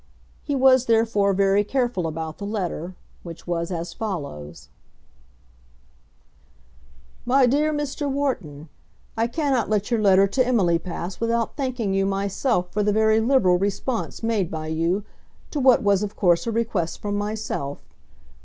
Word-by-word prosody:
He 285 - -2
was 260 -1 +4
therefore 225 -3 +3
very 195 +1 +3
careful 240 -6 -1
about 160 0 -5
the - - -6
letter, 185 -4 -4 0.3
which 170 -2 -10
was 170 -1 -2
as 170 -1 -4
follows: 110 - -6 2.5
MY 260 +2 +4
DEAR 295 +5 +2
MR. 295 -1 -3
WHARTON, 200 - -3 0.5
I 225 +1 +1
cannot 265 -5 0
let 210 +1 0
your 230 -2 +2
letter 195 -1 +5
to 255 +7 +1
Emily 195 -10 +2
pass 175 +1 -6
without 230 0 -1
thanking 250 -8 -2
you 195 0 +1
myself 195 0 -1
for 210 - 0
the 210 0 +2
very 220 +1 +3
liberal 220 -7 +3
response 210 +5 -3
made 220 -6 0
by 155 -1 -5
you 165 +5 0 0.5
to 300 - -2
what 260 -3 +5
was 200 -1 +3
of 210 0 -4
course 175 +1 +2
a - - 0
request 220 -7 -2
from 205 -1 -3
myself. 205 -9 -4
205 Hz, 145 wpm, -23 LUFS, 180-240 Hz, 2.5 s, letter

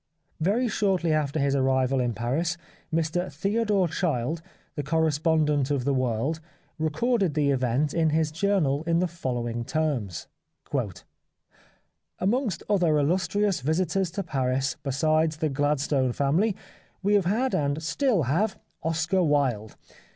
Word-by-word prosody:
Very 210 +10 +1
shortly 190 -6 +1
after 150 -1 0
his 140 0 +1
arrival 130 0 +2
in 120 -2 0
Paris 155 +9 -1 0.3
Mr 165 +3 -1
Theodore 205 -2 +1
Child, 160 -2 -1 0.3
the 145 - -3
corre 160 +2 +1
spondent 150 -2 +1
of 140 -4 0
The 140 - +2
World, 130 +4 0 0.4
recorded 185 - +1
the 145 -2 +2
event 130 +2 0
in 165 -2 +2
his 155 0 +1
journal 165 -5 +1
in 165 0 +3
the 180 +1 +2
following 120 -8 -3
terms: 130 - -2 0.9
" - - -37
Amongst 215 +1 0
other 175 -7 +3
illustrious 185 +5 +1
visitors 170 +5 0
to 200 - -2
Paris, 135 -4 -1
besides 155 +3 +1
the 155 -1 0
Gladstone 140 -2 +1
family, 170 - +1 0.5
we 205 +2 +2
have 200 -3 +3
had 235 +8 +1
and 145 +1 0
still 220 - +1
have, 180 - 0 0.2
Oscar 165 +3 0
Wilde. 135 -9 +1
155 Hz, 135 wpm, -26 LUFS, 140-180 Hz, 0.9 s, in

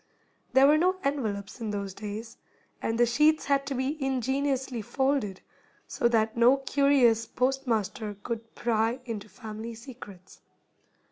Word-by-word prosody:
There 265 +1 +7
were 300 +2 +5
no 365 +3 +3
envelopes 220 -7 -2
in 220 - -3
those 200 -2 -4
days, 215 +3 -7 0.5
and 225 - -1
the 240 - +5
sheets 300 +6 +3
had 280 -1 +1
to 275 - -2
be 270 +3 -2
ingeniously 265 -1 -1
folded, 265 -4 -1 0.4
so 235 - 0
that 220 -2 +1
no 240 +3 +5
curious 270 -4 +3
postmaster 245 -4 -1
could 230 -1 -5
pry 230 +1 0
into 215 -3 -6
family 220 +1 -7
secrets. 220 -6 -12
240 Hz, 135 wpm, -28 LUFS, 220-270 Hz, 0.5 s, There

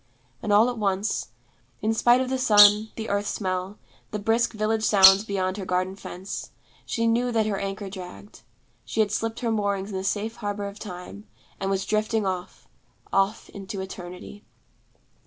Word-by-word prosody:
And 210 - -2
all 210 +3 +6
at 245 -2 -3
once, 200 0 -1 0.6
in 220 +1 +2
spite 240 +3 +4
of 260 - -2
the 260 - 0
sun, 210 -2 +6
the 220 0 -5
earth 205 0 -1
smell, 185 0 -3 0.3
the 210 - -3
brisk 225 +4 +1
village 215 0 0
sounds 195 -1 +7
beyond 190 -2 -2
her 200 - -4
garden 185 +1 -1
fence, 190 0 -7 0.4
she 230 - -1
knew 240 +2 +2
that 225 -2 +1
her 205 -2 -1
anchor 195 +1 -4
dragged, 180 - -10 0.4
she 220 - -1
had 210 -2 +1
slipped 225 +1 -2
her 235 -2 0
moorings 200 -2 -1
in - - -5
the 190 - -4
safe 215 +3 -2
harbor 205 -2 -3
of 200 +1 -9
Time, 190 +1 -9 0.3
and 195 - -2
was 195 0 -1
drifting 215 0 0
off, 185 -1 -5 0.5
off 195 +3 +1
into 195 0 -7
Eternity. 190 +1 -8
205 Hz, 175 wpm, -25 LUFS, 190-220 Hz, 0.6 s, sounds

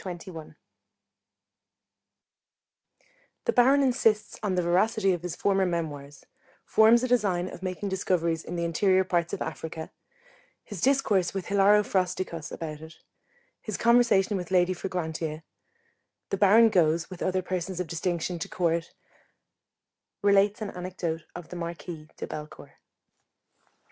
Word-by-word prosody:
CHAPTER 180 0 -7
XXI 160 -2 -10 2.9
_The - - +1
Baron 270 +3 +5
insists 235 -5 +1
on 200 -4 -1
the 180 - +1
veracity 195 +3 +2
of 175 - -4
his 175 -2 -5
former 195 -1 +1
Memoirs 145 -5 -5 0.4
Forms 225 +2 +5
a - - +1
design 200 -8 +1
of 185 - -9
making 185 +2 -4
discoveries 170 -4 0
in 175 - -6
the 170 - -2
interior 185 +3 +2
parts 175 -2 -1
of - - -3
Africa 160 0 -6 0.7
His 205 -6 -8
discourse 210 -9 +2
with 195 - -4
Hilaro 200 +1 +5
Frosticos 180 -4 -2
about 155 -2 -6
it 160 0 -12 0.6
His 215 -3 -4
conversation 235 -4 +3
with 180 -2 -6
Lady 180 0 +3
Fragrantia 160 -4 -4 0.9
The 195 - 0
Baron 215 +4 +6
goes, 165 -3 +2
with 185 - -9
other 185 0 0
persons 185 0 -3
of 180 - -1
distinction, 170 +1 -2
to 195 +4 -5
Court; 170 -2 -1 1.3
relates 200 +1 +3
an 205 - -5
anecdote 180 -3 -4
of 175 -2 -9
the - - -8
Marquis 170 -2 -7
de - - -4
Bellecourt. 150 0 -9
180 Hz, 135 wpm, -27 LUFS, 170-200 Hz, 2.9 s, Baron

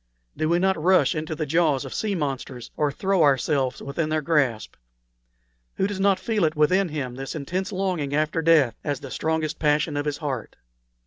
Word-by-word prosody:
Do 155 - -1
we 170 - +3
not 190 -2 +1
rush 185 +3 +4
into 155 0 -4
the 155 - -2
jaws 150 -3 +1
of 135 - -7
sea 210 -2 -1
monsters, 135 -6 -4
or 150 -1 +1
throw 190 +4 0
ourselves 135 -2 +1
within 155 +3 -2
their 155 -1 0
grasp? 140 -9 0 1.0
Who 190 - 0
does 200 -1 -3
not 195 -1 +3
feel 210 -8 +1
within 180 +5 +3
him 140 -5 -4
this 135 +3 -6
intense 180 +6 -3
longing 180 -7 -1
after 155 +2 0
death 155 -7 +4
as 145 -3 -2
the 135 -2 -8
strongest 160 +4 -2
passion 150 0 +1
of 145 0 -2
his 145 -1 -1
heart?" 135 -7 -4
155 Hz, 185 wpm, -24 LUFS, 140-175 Hz, 1.0 s, rush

